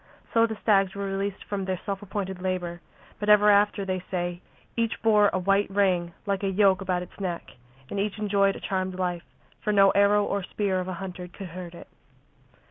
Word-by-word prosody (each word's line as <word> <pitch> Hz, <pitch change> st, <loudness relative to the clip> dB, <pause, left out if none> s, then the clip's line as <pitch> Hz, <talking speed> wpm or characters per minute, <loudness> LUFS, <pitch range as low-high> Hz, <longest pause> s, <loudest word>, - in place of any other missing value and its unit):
So 230 Hz, 0 st, +5 dB
the 220 Hz, -1 st, -5 dB
stags 195 Hz, -3 st, +3 dB
were 200 Hz, 0 st, -3 dB
released 195 Hz, 0 st, -3 dB
from 200 Hz, -1 st, -3 dB
their 185 Hz, -2 st, -2 dB
self 200 Hz, 0 st, -3 dB
appointed 190 Hz, -2 st, -4 dB
labour, 180 Hz, -2 st, -3 dB, 0.4 s
but 210 Hz, -, -2 dB
ever 210 Hz, 0 st, +7 dB
after, 205 Hz, 0 st, +3 dB
they 185 Hz, -1 st, -2 dB
say, 175 Hz, -1 st, -3 dB, 0.3 s
each 230 Hz, -1 st, -1 dB
bore 210 Hz, -2 st, +5 dB
a -, -, 0 dB
white 195 Hz, +2 st, +2 dB
ring 185 Hz, -4 st, +1 dB
like 200 Hz, -2 st, -1 dB
a 195 Hz, -, 0 dB
yoke 195 Hz, -1 st, +3 dB
about 180 Hz, -2 st, -1 dB
its 180 Hz, -, -15 dB
neck, 180 Hz, -3 st, -4 dB, 0.4 s
and 200 Hz, -, -2 dB
each 205 Hz, 0 st, -1 dB
enjoyed 200 Hz, -2 st, +2 dB
a -, -, -7 dB
charmed 185 Hz, -1 st, -2 dB
life, 175 Hz, -2 st, -3 dB, 0.3 s
for 210 Hz, -, +1 dB
no 195 Hz, -1 st, +6 dB
arrow 200 Hz, +1 st, +4 dB
or 200 Hz, -, -1 dB
spear 190 Hz, 0 st, -1 dB
of 180 Hz, -, -4 dB
a 185 Hz, -, -3 dB
hunter 180 Hz, 0 st, -6 dB
could 180 Hz, +1 st, -9 dB
hurt 175 Hz, 0 st, -8 dB
it. -, -, -11 dB
195 Hz, 205 wpm, -26 LUFS, 185-205 Hz, 0.4 s, ever